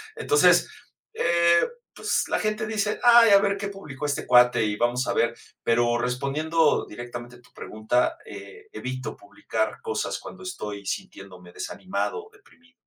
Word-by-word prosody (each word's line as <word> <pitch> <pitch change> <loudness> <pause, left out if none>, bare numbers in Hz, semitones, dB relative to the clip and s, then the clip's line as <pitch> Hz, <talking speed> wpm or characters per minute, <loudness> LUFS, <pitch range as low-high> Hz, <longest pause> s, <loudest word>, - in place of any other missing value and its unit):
Entonces, 430 0 +4 0.5
eh, 170 - +3 0.3
pues, - - -1
la - - 0
gente 215 +1 -1
dice: 210 -1 -1
ay, 235 -2 +7
a 200 - +8
ver 200 0 0
qué 200 - -4
publicó 150 -8 -8
este 145 -1 -2
cuate 125 -1 +5
y 105 -1 -1
vamos 120 +2 0
a - - 0
ver. - - +1 0.3
Pero 120 0 +2
respondiendo 145 +6 +1
directamente 120 +2 -9
a - - -21
tu 125 - -24
pregunta, 110 +3 -1
eh, 425 0 -11
evito 130 - -6
publicar 355 +5 -4
cosas 450 -1 -3
cuando - - -11
estoy 105 - -6
sintiéndome 90 -2 -7
desanimado 200 - -4
o - - -18
deprimido. 250 -12 -24
155 Hz, 155 wpm, -25 LUFS, -, 0.5 s, a